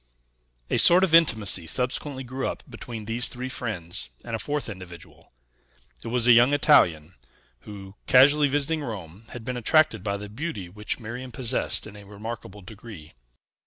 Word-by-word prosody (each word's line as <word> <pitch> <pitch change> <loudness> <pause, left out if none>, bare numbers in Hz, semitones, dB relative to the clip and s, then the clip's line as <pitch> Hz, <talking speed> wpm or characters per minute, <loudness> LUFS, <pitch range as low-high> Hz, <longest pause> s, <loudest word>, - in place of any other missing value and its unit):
A - - +3
sort 180 +2 +6
of 180 -4 +1
intimacy 110 - +3
subsequently 130 - 0
grew 130 +1 -4
up - - -5
between 115 -3 -8
these 115 +3 -2
three 125 +1 -6
friends 90 - -5 0.2
and 115 -1 -4
a - - -4
fourth 145 +2 -3
individual; 90 -5 -11 0.7
it - - -7
was 120 0 +2
a - - +8
young 120 +4 +6
Italian, 90 - +3 0.6
who, 95 -2 -10
casually 145 +3 +6
visiting 145 +3 -1
Rome, 105 - -8
had 120 -2 -9
been 125 -1 -3
attracted 120 - +2
by 100 -1 -2
the 105 +1 -8
beauty 105 - -6
which 105 +6 -5
Miriam 125 +3 -7
possessed 125 +1 -1
in 110 - -11
a 105 - -12
remarkable 105 -1 -9
degree. 100 -6 -12
115 Hz, 165 wpm, -25 LUFS, 100-130 Hz, 0.7 s, a